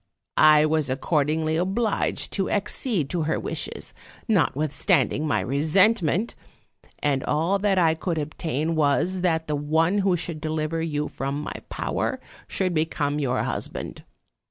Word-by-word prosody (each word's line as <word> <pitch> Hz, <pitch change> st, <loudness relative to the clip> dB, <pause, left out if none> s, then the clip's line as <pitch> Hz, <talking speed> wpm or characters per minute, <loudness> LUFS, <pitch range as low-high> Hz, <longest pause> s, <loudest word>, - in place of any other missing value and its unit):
I 155 Hz, 0 st, +7 dB
was 155 Hz, -2 st, +1 dB
accordingly 155 Hz, +3 st, 0 dB
obliged 195 Hz, +5 st, -1 dB
to 195 Hz, -2 st, 0 dB
accede 205 Hz, -, -1 dB
to 175 Hz, -, 0 dB
her -, -, 0 dB
wishes, -, -, -4 dB, 0.3 s
notwithstanding 155 Hz, -, +1 dB
my 145 Hz, -, +1 dB
resentment; 180 Hz, -, +2 dB, 0.6 s
and 140 Hz, -2 st, 0 dB
all 165 Hz, +7 st, +1 dB
that 200 Hz, -1 st, +1 dB
I 165 Hz, -3 st, +4 dB
could 165 Hz, +1 st, -3 dB
obtain 155 Hz, +1 st, -2 dB
was, 160 Hz, +5 st, +1 dB
that 160 Hz, -3 st, +1 dB
the 150 Hz, -, -1 dB
one 160 Hz, +6 st, +1 dB
who 190 Hz, -2 st, +2 dB
should 160 Hz, -2 st, -4 dB
deliver 155 Hz, +1 st, -2 dB
you 150 Hz, -2 st, -2 dB
from 140 Hz, +1 st, -4 dB
my 150 Hz, -, -5 dB, 0.2 s
power -, -, -2 dB, 0.3 s
should 185 Hz, -2 st, -1 dB
become 155 Hz, -2 st, 0 dB
your 130 Hz, -3 st, 0 dB
husband. -, -, -4 dB
160 Hz, 135 wpm, -24 LUFS, 150-180 Hz, 0.6 s, I